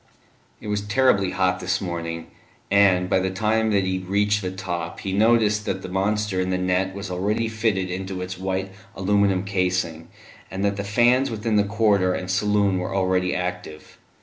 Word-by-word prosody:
It - - -10
was 105 -1 -1
terribly 105 -2 +2
hot 95 -1 0
this 95 +1 -1
morning, 85 -2 -5 0.4
and, 95 -3 +4
by 95 - +2
the 95 0 -1
time 110 +3 +1
that 100 -2 +2
he 95 0 -1
reached 100 +3 +1
the 95 - -3
top 85 -3 -5
he 95 - -3
noticed 105 0 +3
that 95 0 -2
the 95 - -6
monster 100 +1 0
in 95 - -2
the 90 - 0
net 90 +1 0
was 100 -1 -6
already 105 +5 0
fitted 110 -5 -1
into 95 0 -4
its 90 0 -5
white 95 +1 -3 0.2
aluminium 100 -1 +2
casing, 90 -4 -1 0.4
and 95 +1 -3
that 100 0 0
the 100 - -2
fans 120 +6 +3
within 110 0 -2
the 105 - +4
corridor 100 -3 +2
and 90 0 -4
saloon 100 -1 +2
were 90 - -4
already 95 -1 +1
active. 90 -3 -6
95 Hz, 180 wpm, -23 LUFS, 90-105 Hz, 0.4 s, and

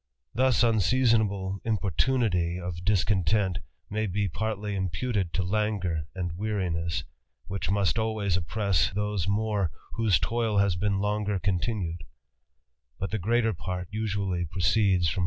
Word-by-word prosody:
Thus_ 130 -1 +3
inseasona 115 +1 +3
ble 95 -1 -4
impo 105 -4 0
rtunity 90 - +1
of 90 -1 -5
dis 100 -1 +3
content 95 -1 +1 0.3
may 110 +1 -1
be 100 +2 0
partly 105 +2 -3
g 95 -1 0
puted 95 -1 -1
To^ 90 +1 0
laagufli: 95 -6 0
anH^JJ^arin^gg^ 90 -2 -2 0.5
whirh 95 -1 -2
must 100 +2 +2
always 110 -4 0
oppress 90 -1 +1
those 105 -2 -1
more 105 -3 +1 0.2
whose 110 -6 +3
toil 110 +6 0
has 100 -3 +3
been 100 +2 0
longer 105 0 0
continued; 90 -3 -1 1.0
>ut 95 - -3
the 110 - -1
gre 110 +6 +1
ater 115 -2 +3
part 90 0 -5
usually 100 -4 -1
proceeds 95 +1 +2
from 85 - -1
100 Hz, 140 wpm, -27 LUFS, 90-110 Hz, 1.0 s, Thus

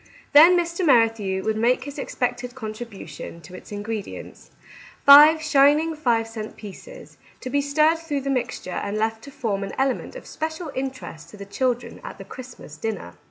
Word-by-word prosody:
Then 330 +5 +8
Mr. 340 +1 -1
Merrithew 225 - +2
would 220 0 -1
make 245 +3 +2
his 285 +1 -8
expected 250 -1 -3
contribu 220 -5 -8
tion 155 +2 -9
to 165 +3 -14
its 185 - -12
ingredients, 205 0 -7 0.3
— - - -21
five 300 +3 +9
shining 300 +2 +4
five 240 -7 0
cent 220 -1 -8
pieces, 215 - -12 0.2
to 255 - -7
be 285 +1 +2
stirred 305 +3 +2
through 300 -4 -3
the 275 +1 -2
mixture 245 -7 -3
and 200 +3 -3
left 220 +1 -2
to - - -10
form 220 -8 -3
an 195 - -6
element 270 - -1
of - - -9
special 315 0 -5
interest 260 - -6
to 210 - -13
the 200 - -8
children 245 +4 -2
at - - -8
the - - -10
Christmas 250 - -11
dinner. 195 - -5
250 Hz, 180 wpm, -23 LUFS, 215-290 Hz, 0.3 s, five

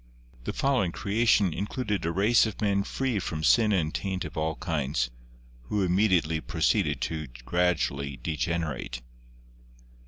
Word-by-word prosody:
The - - -1
following 130 -10 +1
creation 105 -2 +2
included 105 - -2
a - - +1
race 105 +6 +4
of 110 - -7
men 100 -2 +2
free 125 +2 -1
from 80 -3 -4
sin 110 +7 +5
and 80 -6 +1
taint 95 -2 -2
of - - -8
all 80 0 -1
kinds, 70 -8 -1 0.5
who 105 +8 0
immediately 90 -4 +2
proceeded - - +1
to 80 -2 -3 0.2
gradually 75 -6 0
degenerate. 75 -5 -3
90 Hz, 130 wpm, -27 LUFS, 80-105 Hz, 0.5 s, sin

